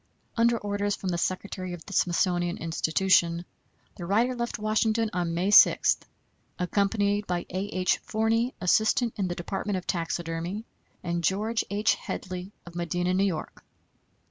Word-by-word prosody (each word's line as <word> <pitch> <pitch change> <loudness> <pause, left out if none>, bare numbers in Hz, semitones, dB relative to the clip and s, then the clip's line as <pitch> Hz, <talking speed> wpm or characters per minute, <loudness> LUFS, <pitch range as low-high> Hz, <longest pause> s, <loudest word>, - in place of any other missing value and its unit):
Under 235 0 +3
orders 205 -1 -1
from 190 - -4
the 175 - 0
Secretary 185 0 -3
of 175 - -9
the 200 - -9
Smithsonian 175 -1 +1
Institution, 170 +1 +2 0.5
the 175 - -6
writer 230 +6 +2
left 235 -1 -3
Washington 215 +1 +1
on 175 -2 -1
May 185 +4 +1
6, - - +7 0.6
accompanied 200 +2 +1
by 175 -1 -2
A. 185 +2 -2
H. 185 -2 +1
Forney, 225 +3 0
assistant 220 +5 +2
in 195 -3 -1
the 175 - -3
department 195 +3 -3
of 180 - -6
taxidermy, 170 +4 -3 0.4
and 170 -1 -2
George 215 +6 +1
H. 210 +2 +2
Hedley, 185 0 -6
of 175 - -11
Medina, 175 +1 -1
New 195 +2 +3
York. 175 -6 -4
190 Hz, 145 wpm, -27 LUFS, 175-210 Hz, 0.6 s, 6